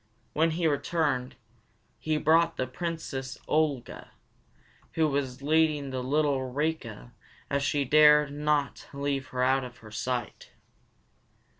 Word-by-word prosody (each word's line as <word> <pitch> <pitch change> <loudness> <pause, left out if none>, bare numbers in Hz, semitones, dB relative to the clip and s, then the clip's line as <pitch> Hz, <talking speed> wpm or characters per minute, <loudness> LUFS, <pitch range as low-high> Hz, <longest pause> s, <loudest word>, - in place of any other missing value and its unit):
When 160 +2 +3
he 175 - 0
returned, 145 -4 0 0.6
he 155 -1 0
brought 165 +2 +3
the 130 - 0
Princess 135 -2 -5
Olga, 150 -5 -1 0.8
who 160 -1 +2
was 135 -2 -2
leading 150 -2 +2
the 130 -1 -3
little 135 -1 0
Rika 145 - -3 0.4
as 140 0 +1
though - - -1
she 145 -1 +1
dared 150 +1 +6
not 150 -2 -1
leave 140 -1 -2
her 125 0 -2
out 135 +1 +2
of 125 -1 -9
her 110 - -11
sight. 125 +2 -4
145 Hz, 130 wpm, -28 LUFS, 130-155 Hz, 0.8 s, dared